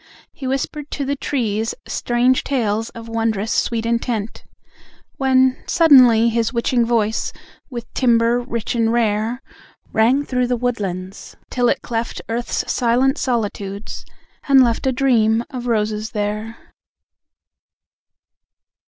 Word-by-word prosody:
He 265 - -6
whispered 275 +2 -3
to 280 - -3
the 280 +1 -1
trees 225 -6 -2
strange 245 +2 +1
tales 225 -4 -1
Of 230 0 -10
wondrous 225 -2 -1
sweet 230 -1 0
intent, 230 -2 -2 0.7
When, 260 -1 +2
suddenly, 255 -9 +6
his 230 0 0
witching 240 0 +1
voice 225 -2 0 0.4
With 240 -4 -6
timbre 235 -1 +3
rich 235 -3 -4
and 230 -1 +1
rare, 230 +1 0 0.5
Rang 250 +6 +3
through 250 -2 0
the 245 0 0
woodlands 195 -6 -4 0.2
till 245 -1 +2
it - - -1
cleft 230 0 -3
Earth's 235 +1 -2
silent 255 +4 +2
solitudes, 205 -4 -3 0.4
and 270 -2 +7
left 235 +2 0
A - - +3
Dream 235 -4 +2
of 250 -2 -5
Roses 215 -1 -1
there! 210 +2 -3
235 Hz, 120 wpm, -20 LUFS, 220-255 Hz, 0.7 s, and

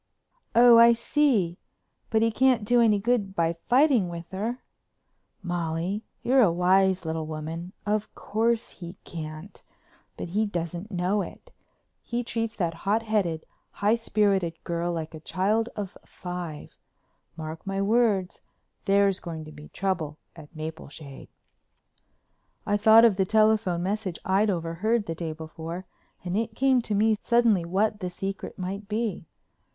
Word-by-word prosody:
"Oh, 235 0 +8
I 235 0 +8
see. 230 - +1 0.5
But 220 -1 +2
he 230 - +2
can't 250 -2 +3
do 240 +2 +4
any 215 -3 +4
good 205 -2 0
by 165 -1 +1 0.2
fighting 250 - +4
with 170 0 -7
her." 225 +6 -3 0.8
"Molly, 175 +3 -2 0.2
you're 260 +2 +4
a 200 -8 +5
wise 185 +1 +3
little 160 -1 -3
woman. 160 +4 -6
Of 210 0 -1
course 230 +2 0
he 175 +1 -8
can't, 155 +2 -8 0.6
but - - -5
he 210 +5 0
doesn't 175 +1 -4
know 185 +2 0
it. - - -9 0.5
He 240 +1 -3
treats 230 -1 -3
that 170 -4 -1
hot 205 +7 0
headed, 195 -8 -1 0.3
high 205 +2 +2
spirited 200 -7 +1
girl 170 0 -2
like 165 -1 -4
a 160 - -8
child 205 +8 0
of 200 -2 -5
five. 175 - -7 0.6
Mark 160 +3 -7
my 195 0 -2
words, 205 -3 +1 0.4
there's 200 -1 +3
going 160 -2 -7
to 155 - -10
be 150 0 -12
trouble 170 -6 -2 0.2
at 160 -1 -14
Mapleshade." 155 -2 -8 1.4
I 205 - +1
thought 220 +2 +7
of 210 -5 +4
the 190 - +2
telephone 215 -4 +2
message 195 -2 -2
I'd 195 +3 +2
overheard 190 +6 0
the 165 - -3
day 165 0 -4
before 160 +3 -7 0.4
and 175 +1 -2
it 225 +1 -2
came 265 -1 +3
to 215 -3 -2
me 215 +1 +3
suddenly 230 -7 +3
what 205 +4 0
"the 180 -3 -3
secret" 195 +5 -5
might 195 +2 -5
be. 215 -5 -3
195 Hz, 145 wpm, -26 LUFS, 170-220 Hz, 1.4 s, Oh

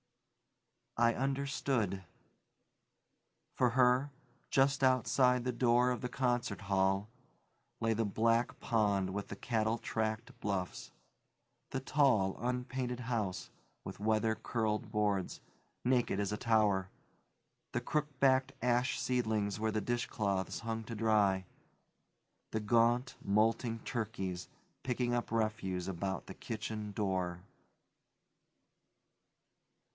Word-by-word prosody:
I 115 0 +4
understood. 135 -7 -1 1.5
For 125 -2 +3
her, 125 +3 +3 0.4
just 135 0 +3
outside 125 0 +3
the 125 - 0
door 120 0 +3
of 125 - -2
the 125 - -3
concert 120 -5 -1
hall, 95 0 +1 0.7
lay 115 0 +2
the 115 +1 0
black 115 +3 +1
pond 100 -4 +1
with 100 +1 -4
the - - -6
cattle 110 +1 0
tracked 110 0 -3
bluffs; 95 -3 -3 0.8
the 135 - -2
tall, 130 -9 +3
unpainted 125 0 -2
house, 110 -6 -2 0.3
with - - -8
weather 110 +1 +2
curled 110 -1 -2
boards; 105 -3 0 0.5
naked 125 -5 +2
as 100 0 -1
a 105 - -1
tower, 105 -5 +2 0.8
the - - -1
crook 150 -1 0
backed 130 0 +4
ash 125 +2 +1
seedlings 110 -5 0
where 110 0 0
the 110 - -1
dishcloths 100 -4 -1
hung 115 -1 -3
to 115 - -6
dry; 105 -4 +2 1.1
the 110 - 0
gaunt, 120 +4 +2
molting 115 +3 +2
turkeys 100 -7 -4 0.3
picking 125 -1 0
up 120 -2 -1
refuse 110 -5 -1
about 95 0 -3
the - - -8
kitchen 110 -1 -5
door. 95 -4 -1
115 Hz, 110 wpm, -34 LUFS, 100-125 Hz, 1.5 s, I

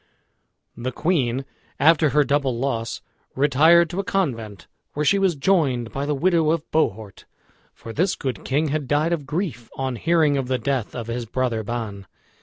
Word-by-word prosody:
The 120 +2 -4
queen, 135 -5 0 0.3
after 155 +2 +5
her 150 +1 +3
double 140 -3 0
loss, 115 -3 -3 0.3
retired 160 +5 +5
to 180 - -3
a - - 0
convent, 115 - -2 0.3
where 150 +1 -1
she 200 +7 +4
was 190 -4 +2
joined 135 -8 +1
by 140 +1 -3
the 150 - 0
widow 165 +1 +2
of 160 -1 +1
Bohort, 110 -10 -1 0.5
for 115 - -10
this 180 +7 +1
good 130 -7 -4
king 145 +3 0
had 150 -1 -2
died 150 +4 +1
of 150 -5 -4
grief 150 - -3
on 130 -2 -3
hearing 160 -1 +2
of 135 -2 -2
the 130 0 0
death 130 -4 -2
of 120 -2 -4
his 115 0 -4
brother 120 -1 -1
Ban. 105 -3 -5
140 Hz, 175 wpm, -23 LUFS, 120-160 Hz, 0.5 s, after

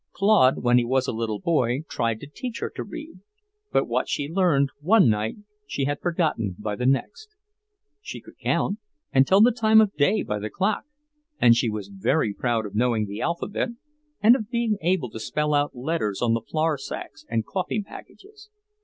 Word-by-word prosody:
Claude, 195 -13 +4
when 120 0 +5
he - - +1
was 130 +2 +1
a - - 0
little 110 -2 -2
boy, 130 -5 +1
tried 115 -1 -1
to - - -9
teach 235 - -6
her - - -3
to - - -5
read, 315 +1 -9 0.5
but - - +2
what - - -1
she 145 - -1
learned 160 -6 +2
one 190 - +5
night 105 +1 -1 0.3
she 135 - -2
had 145 +1 -2
forgotten 155 - -1
by 105 -1 -3
the 125 +4 -1
next. 210 - -1 0.7
She - - -7
could - - -17
count, 205 +2 0 0.3
and 135 0 +4
tell 195 +2 +5
the 240 +3 +7
time 220 -2 +4
of 210 -2 +3
day 190 +9 +2
by 105 0 -3
the 105 +1 -4
clock, 200 - -1 0.5
and 115 -1 +6
she 115 0 +1
was 105 -2 -5
very 105 +4 0
proud 115 0 -1
of 100 - -8
knowing 115 -1 +1
the 100 +1 -6
alphabet 170 +6 -2 0.5
and 225 +4 +7
of 220 -5 -4
being 235 -3 0
able 165 -8 0
to - - -7
spell 150 +6 -1
out 145 -1 +1
letters 125 -6 -2
on 120 -2 +2
the 115 - 0
flour 155 +4 -1
sacks 320 - -7
and 110 -1 -1
coffee 195 - -2
packages. 415 - -14
145 Hz, 195 wpm, -24 LUFS, -, 0.7 s, the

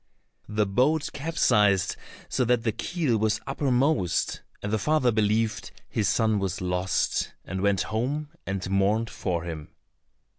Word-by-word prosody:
The 105 0 +1
boat 135 +10 +1
capsized 105 - +2 0.3
so - - 0
that 120 -1 +2
the 115 - +1
keel 145 - -1
was 110 +1 +1
uppermost, 135 - +1 0.2
and 105 +1 -2
the 110 - +2
father 130 +2 +2
believed 110 0 +1 0.2
his 105 -4 0
son 110 -2 +2
was 95 -1 -2
lost, 90 +1 0
and 95 0 -4
went 100 -1 +2
home 140 +7 -2 0.2
and 95 -1 -2
mourned 100 +4 +1
for 85 -3 -2
him. 80 -3 -6
110 Hz, 140 wpm, -26 LUFS, 95-125 Hz, 0.3 s, capsized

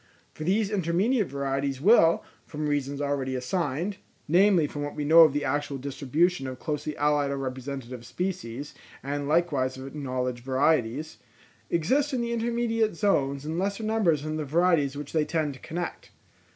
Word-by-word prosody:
For 155 - -7
these 200 +5 +1
intermediate 200 +4 +1
varieties 135 0 -2
will, 170 - +5 0.2
from 150 -1 -3
reasons 140 -1 -1
already 140 -2 -1
assigned 165 +7 -2 0.3
(namely 180 0 +4
from 145 0 -5
what 145 0 -4
we 150 - -3
know 160 +3 +7
of 160 -2 +7
the 145 +1 -2
actual 145 0 -1
distribution 140 +4 0
of 130 -1 -6
closely 150 +1 -4
allied 145 -1 +2
or 140 - -2
representative 130 -2 -5
species, 145 -1 -4 0.3
and 140 +1 -3
likewise 145 -5 +1
of 130 - -8
acknowledged 130 -3 -3
varieties), 135 +1 0 0.5
exist 270 - +1
in 245 - 0
the 235 0 -2
intermediate 230 -2 0
zones 140 -8 +1
in 160 +3 -2
lesser 200 +3 -2
numbers 205 -9 +1
than 155 0 -3
the 155 - -2
varieties 150 -2 +2
which 145 -1 -7
they 155 -2 +3
tend 155 -2 -1
to 130 - -13
connect. 175 +1 -5
150 Hz, 165 wpm, -27 LUFS, 135-175 Hz, 0.5 s, know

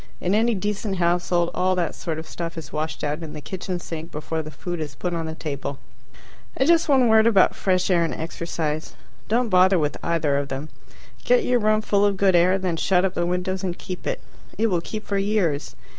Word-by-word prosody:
In 180 - 0
any 225 +2 +3
decent 205 +1 -2
household 175 0 +1
all 185 +1 +1
that 175 -3 -1
sort 160 -2 -4
of 160 - -7
stuff 170 -1 -5
is 160 - -8
washed 155 +1 -3
out 150 +2 -2
in 160 -2 -7
the - - -6
kitchen 180 +3 -4
sink 165 0 -7
before 160 +2 -3
the 155 - -8
food 175 +4 -5
is 150 -4 -5
put 175 +8 -3
on 165 -1 -2
the 160 - -5
table. 140 -3 -4 0.8
And 265 - +2
just 335 -1 +4
one 260 -3 +5
word 220 0 +5
about 200 -5 +5
fresh 185 -1 +1
air 170 -2 +4
and 165 - -1
exercise. 160 -3 -4 0.3
Don't 235 +2 +1
bother 185 0 +5
with 150 -2 0
either 155 -4 +1
of 140 0 -1
them. 140 +3 -5 0.5
Get - - +4
your 250 -6 +2
room 215 0 +2
full 205 -1 +2
of 200 -1 +2
good 190 -2 +4
air, 180 +2 +4
then 185 -3 -2
shut 180 +2 +2
up 190 - -1
the 175 -1 0
windows 180 +1 -1
and 180 -2 -2
keep 185 -1 -7
it. - - -2 0.3
It 220 0 +2
will 175 -2 +1
keep 215 +5 -6
for 200 -1 0
years. 195 -8 0
180 Hz, 220 wpm, -23 LUFS, 160-200 Hz, 0.8 s, one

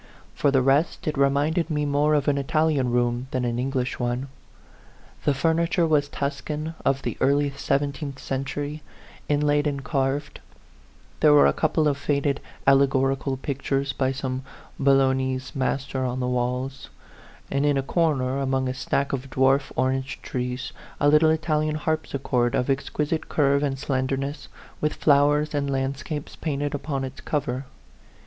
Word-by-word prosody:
For 145 - +2
the 135 -2 +3
rest, 145 +7 +2
it 155 - 0
re 140 0 +4
minded 155 +5 0
me 150 -2 0
more 145 +1 +2
of 145 - 0
an 140 -1 +2
Italian 150 -2 +1
room 120 +1 0
than 130 -1 -1
an 120 0 -1
English 130 -1 -2
one. 125 +2 -2 1.0
The 145 - +3
furniture 165 +4 +2
was 150 -3 +2
Tuscan 150 +3 -3
of 135 0 +1
the - - -3
early 140 +1 +3
seventeenth 140 0 -2
century, 145 +3 -4 0.5
inlaid 145 0 +2
and 140 -2 -3
carved; 140 0 -1 0.8
there 150 -1 +6
were 145 - +7
a - - +4
couple 155 0 +1
of 140 -1 0
faded 140 -1 0 0.3
alle 135 0 +6
gorical 135 0 0
pictures 140 0 -2
by 130 0 0
some 130 -1 -3 0.4
Bolognese 130 -1 +2
master 135 -1 -1
on 125 0 -2
the 125 - -1
walls; 125 +2 -2 0.6
and 140 +1 +1
in 145 -1 +3
a 135 - 0
corner, 135 -4 +1
among 130 -1 0
a 130 - -1
stack 135 +2 -1
of 135 0 -3
dwarf 135 +2 +2
orange 130 +1 -1
trees, 125 0 -4 0.3
a 145 - +4
little 150 +2 +5
Italian 155 -1 +1
harp 155 +1 -1
sichord 125 -3 0
of 125 +2 +1
exquisite 150 +3 -2
curve 140 -1 +2
and 140 -2 -1
slenderness, 135 +1 -2 0.3
with 150 - 0
flowers 150 +1 +3
and 140 -1 -1
landscapes 140 +2 -3
painted 145 -2 -2
upon 140 -1 -3
its 130 +1 -7
cover. 135 -3 -2
140 Hz, 155 wpm, -25 LUFS, 130-145 Hz, 1.0 s, were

